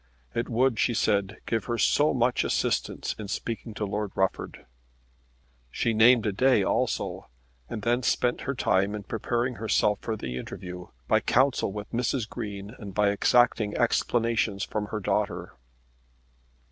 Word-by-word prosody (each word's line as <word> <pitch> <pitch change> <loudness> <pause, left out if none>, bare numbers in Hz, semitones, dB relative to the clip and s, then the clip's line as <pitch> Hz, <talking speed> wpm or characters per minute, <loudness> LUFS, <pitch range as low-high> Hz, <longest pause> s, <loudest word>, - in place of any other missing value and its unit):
"It 115 - -2
would," 120 -1 +2
she 120 - +2
said, 100 -1 +1
"give 115 -3 -1
her 120 - -2
so 145 +7 +3
much 125 0 +1
assistance - - -1
in 105 - -5
speaking 115 +1 -4
to 105 - -2
Lord 105 0 -3
Rufford!" 95 0 -2 1.0
She 115 - 0
named 115 +1 +6
a 105 - +1
day 125 +1 +3
also, - - -1 0.4
and 105 - -5
then 120 +3 +2
spent 125 0 +1
her 140 - 0
time 100 -2 +1
in 105 - -6
preparing 120 +4 -2
herself 105 -1 +1
for 110 -1 -3
the 65 -8 -5
interview 90 +6 -7 0.2
by - - +4
counsel 130 -4 +2
with 105 0 -7
Mrs. 120 0 -1
Green 105 -4 -6
and 100 -4 -8
by 105 -1 +3
exacting 110 0 +3
explanations 115 -3 +1
from 105 -1 -3
her 110 - -3
daughter. 100 - -1
110 Hz, 150 wpm, -27 LUFS, 100-120 Hz, 1.0 s, named